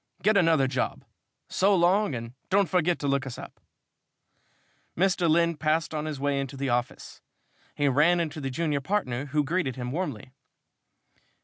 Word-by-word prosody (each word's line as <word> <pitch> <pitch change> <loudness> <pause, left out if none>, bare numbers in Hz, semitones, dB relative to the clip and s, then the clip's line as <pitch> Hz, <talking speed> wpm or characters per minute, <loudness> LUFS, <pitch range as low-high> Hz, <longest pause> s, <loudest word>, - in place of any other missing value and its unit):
Get 215 +1 +4
another 165 -7 +4
job. 130 -1 -2 0.4
So 195 +1 +2
long, 180 -2 +2
and 115 0 -6 0.2
don't 200 0 +3
forget 175 -2 +1
to 145 - -3
look 140 -1 0
us 125 - -7
up." - - -10 1.4
Mr. 180 -1 +2
Lynn 170 0 +2
passed 160 +2 0
on 155 0 -3
his 155 -3 -4
way 140 0 0
into 135 0 -5
the 135 0 -2
office. 120 0 -3 0.5
He 145 - +1
ran 155 +6 +4
into 155 -2 -3
the 135 - -3
junior 150 +1 -1
partner, 135 -7 -2
who 150 +1 +1
greeted 145 -3 -1
him 125 -1 -5
warmly. 140 - -4
150 Hz, 165 wpm, -27 LUFS, 135-175 Hz, 1.4 s, Get